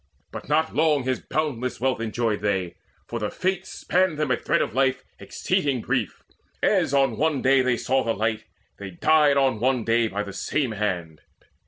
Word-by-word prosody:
But - - -8
not 160 +2 +1
long 150 -3 +2
His 130 0 -1
boundless 125 -6 -3
wealth 130 -2 0
enjoyed 115 -1 -1
they, 95 -4 -1 0.3
for 120 - -4
the 105 -1 -2
Fates 190 0 -2
Span 185 -2 0
them 150 -3 -1
a - - +4
thread - - 0
of - - -5
life 130 0 +1 0.2
exceeding 140 -3 -1
brief. - - -2 0.4
As - - +2
on 135 -4 +2
one 155 -2 0
day 135 0 +5
they 125 -1 +1
saw 130 +2 +1
the 115 0 -1
light, 110 +1 -1 0.3
they 100 -1 -6
died 145 - +3
On 135 -5 +2
one 125 0 +1
day 115 0 +2
by 105 0 -3
the 100 -1 -8
same 130 +5 -1
hand. 90 -7 -3
130 Hz, 185 wpm, -24 LUFS, 110-145 Hz, 0.4 s, day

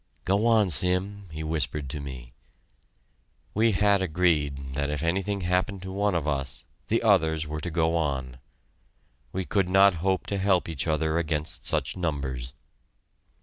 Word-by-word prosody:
"Go 100 +4 +2
on, 110 -5 +4
Sim," 90 +5 +3
he 80 0 -5
whispered 75 -2 -2
to 75 - -5
me. 65 -4 -9 1.2
We 110 +1 +3
had 100 0 +3
agreed 75 -6 0
that 70 +1 -1
if 75 +1 -3
anything 95 +4 -1
happened 90 +2 -1
to 95 - -6
one 100 0 0
of 80 -3 -1
us, 70 -2 -2 0.2
the - - +1
others 80 0 +3
were 75 0 -5
to 85 - -4
go 80 0 +1
on. 65 -6 -2 0.9
We 95 0 -3
could 95 -1 0
not 95 +1 +6
hope 95 0 0
to 100 - -2
help 95 -2 +2
each 80 -2 -3
other 80 +1 +1
against 80 -2 -3
such - - -1
numbers. 65 -7 -3
85 Hz, 155 wpm, -26 LUFS, 75-95 Hz, 1.2 s, not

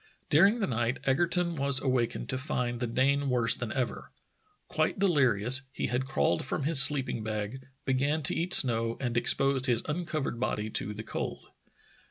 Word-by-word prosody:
During 195 +9 +4
the - - +1
night 120 -2 -2
Egerton 170 +5 0
was 140 -2 +2
awakened 130 -3 -2
to 130 - -2
find 125 -3 -3
the 120 - -3
Dane 140 +4 0
worse 120 -2 +3
than 120 -3 -6
ever. 130 -3 -4 0.6
Quite - - -2
delirious, 130 - +3
he - - -4
had 125 +2 -2
crawled - - -1
from 140 +2 -4
his 150 -1 +7
sleeping 135 -5 +4
bag, 110 +4 -6 0.2
began 140 +4 -1
to - - -1
eat 175 +2 -3
snow, 115 -2 +2
and 120 -3 -4
exposed 135 +2 +1
his 120 -3 0
uncovered 155 -6 -4
body 110 -3 -3
to 105 0 -3
the 110 - -7
cold. - - -6
130 Hz, 170 wpm, -28 LUFS, 120-145 Hz, 0.6 s, his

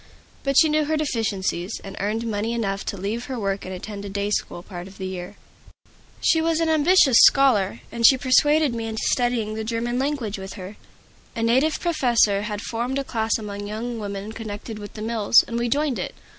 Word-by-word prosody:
But 275 -1 0
she 320 - +7
knew 305 0 +1
her 310 +1 0
deficiencies, 210 - -2
and 195 0 -8
earned 215 +4 -2
money 220 +1 -2
enough 200 -4 -2
to 200 - -4
leave 210 +6 -3
her 260 - -5
work 195 -1 -2
and 185 - -6
attend 200 +2 -7
a 200 - -6
day 200 +1 -2
school 175 -4 -2
part 180 -1 -8
of 195 - -14
the 190 - -5
year. 185 +1 -6 0.9
She 320 - +3
was 325 0 +1
an 330 -1 +1
ambitious 315 -4 +5
scholar, 235 -7 +5
and 235 0 -4
she 265 +3 +8
persuaded 290 +2 +3
me 230 -1 -4
into 220 0 -4
studying 240 -4 0
the 220 0 -4
German 235 +2 -2
language 265 -8 -2
with 190 0 -7
her. 190 +2 -9 0.6
A 230 - -2
native 260 +7 +2
professor 240 - +2
had 210 -1 -4
formed 240 +3 -2
a 275 - -1
class 225 -4 -1
among 205 -2 -6
young 230 +3 -4
women 200 0 -5
connected 220 0 -7
with 205 -1 -9
the 215 - -6
mills, 225 0 +4
and 235 0 -3
we 240 0 -1
joined 285 0 0
it. - - -5
225 Hz, 205 wpm, -23 LUFS, 205-260 Hz, 0.9 s, she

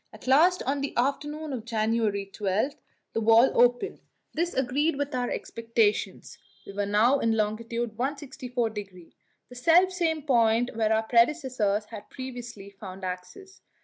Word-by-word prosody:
At - - -14
last, 325 +8 +4
on 275 +1 -1
the 280 - -4
afternoon 295 +4 -1
of 240 -4 -4
January 220 -3 0
12, 200 +6 -1 0.4
the 225 - -1
wall 225 +3 +5
opened. 245 +10 +2 0.3
This 340 +2 -1
agreed 280 +5 +1
with 285 +1 -3
our 245 -1 -1
expectations; 230 -2 -1 0.3
we 200 - -9
were 200 0 -2
now 225 +7 +3
in 225 -2 +1
long. 215 0 +1
164°, 230 - -4 0.4
the 250 - -12
selfsame 335 +2 +3
point 235 -3 +2
where 220 -1 +1
our 220 0 +2
predecessors 235 -4 +1
had 210 -1 -10
previously 240 -6 -8
found 195 -1 -10
access. 185 - -7
235 Hz, 140 wpm, -27 LUFS, 215-275 Hz, 0.4 s, wall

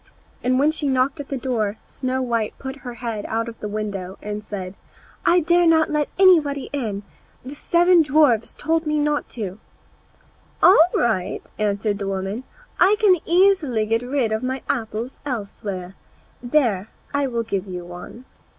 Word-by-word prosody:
And 255 +1 +2
when 290 +3 +4
she 305 -2 -2
knocked 265 +3 +1
at 285 - -7
the 275 - -2
door 225 -5 -1
Snow 260 0 -3
white 230 -3 -1
put 265 0 -6
her 245 -3 -8
head 230 -3 -4
out 230 +1 -1
of 230 -1 -8
the 210 - -4
window 205 -3 -4
and 210 0 -5
said, 190 -3 -6 0.5
"I 355 +1 +5
dare 345 +2 +3
not 320 -1 +4
let 300 -1 0
anybody 315 -8 +4
in; 215 -8 -3 0.4
the 265 - -7
seven 345 +3 +4
dwarfs 285 -7 +3
told 325 +1 -1
me 300 0 +1
not." 295 -3 -1 1.3
"All 360 -3 +8
right," 220 -7 0
answered 205 0 0
the 200 - -3
woman; 195 +5 -3 0.3
"I 390 +4 +6
can 400 -5 +5
easily 340 - +3
get 225 +2 +1
rid 250 -2 -1
of 220 - 0
my 260 +1 -3
apples 230 0 -3
elsewhere. 200 -7 -5 0.5
There, 240 -6 +1 0.2
I 285 -1 +1
will 235 -2 -2
give 200 -3 -3
you 180 -2 -6
one." 180 +8 -10
250 Hz, 160 wpm, -22 LUFS, 210-295 Hz, 1.3 s, All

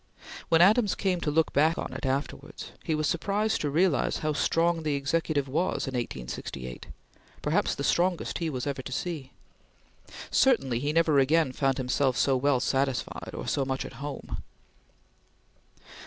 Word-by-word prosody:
When 165 +1 +6
Adams 210 +2 +4
came 185 -3 0
to - - 0
look 160 +2 +1
back 155 +4 +3
on - - -4
it - - -4
afterwards, 135 +2 -4
he 160 - 0
was 155 0 0
surprised 205 +7 0
to 150 - 0
realize 165 +1 +2
how 155 - +1
strong 165 +2 +1
the 150 -2 0
Executive 145 0 0
was 155 +3 -1
in 135 - -4
1868 65 - -5 0.6
perhaps - - +1
the - - -4
strongest 175 0 +1
he 165 -2 -1
was 130 -3 -4
ever 140 -2 -3
to 130 - -8
see. 145 -2 -4 1.0
Certainly 135 - +3
he 145 +3 -1
never 160 -2 +3
again 150 +1 +3
found 135 0 0
himself 130 0 +1
so 135 - +3
well 135 0 +2
satisfied, 135 -2 -1
or - - -5
so 140 - +1
much 135 0 -2
at - - -8
home. 145 0 -5
145 Hz, 160 wpm, -28 LUFS, 135-165 Hz, 1.0 s, When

